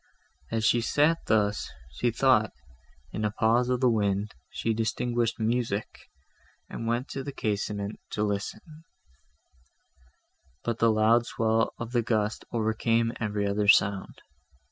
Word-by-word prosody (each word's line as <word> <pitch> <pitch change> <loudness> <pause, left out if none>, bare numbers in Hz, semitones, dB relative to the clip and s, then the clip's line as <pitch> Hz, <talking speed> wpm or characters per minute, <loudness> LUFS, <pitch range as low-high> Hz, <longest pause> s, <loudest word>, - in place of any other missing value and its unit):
As 115 -1 -1
she 120 +2 +4
sat 150 +8 +2
thus, 105 -1 +1 0.2
she - - 0
thought, - - +3 0.6
in 110 - -3
a 105 - +2
pause 115 +4 +2
of 125 0 0
the 130 - +5
wind, 105 -1 0 0.2
she 115 - -1
distinguished 115 +1 -1
music, 115 -2 -2 0.6
and 115 - -6
went 120 +3 -1
to 135 - -5
the 140 - -5
casement 105 -4 -3
to 105 - 0
listen, 100 -1 -2 2.0
but 115 -1 -2
the 115 0 +4
loud 110 +2 +3
swell 115 0 0
of 115 0 -6
the 120 -1 +2
gust 110 -2 -1
overcame 115 0 +1
every 105 -2 -1
other 100 +1 0
sound. 100 -1 +3
110 Hz, 135 wpm, -27 LUFS, 105-120 Hz, 2.0 s, the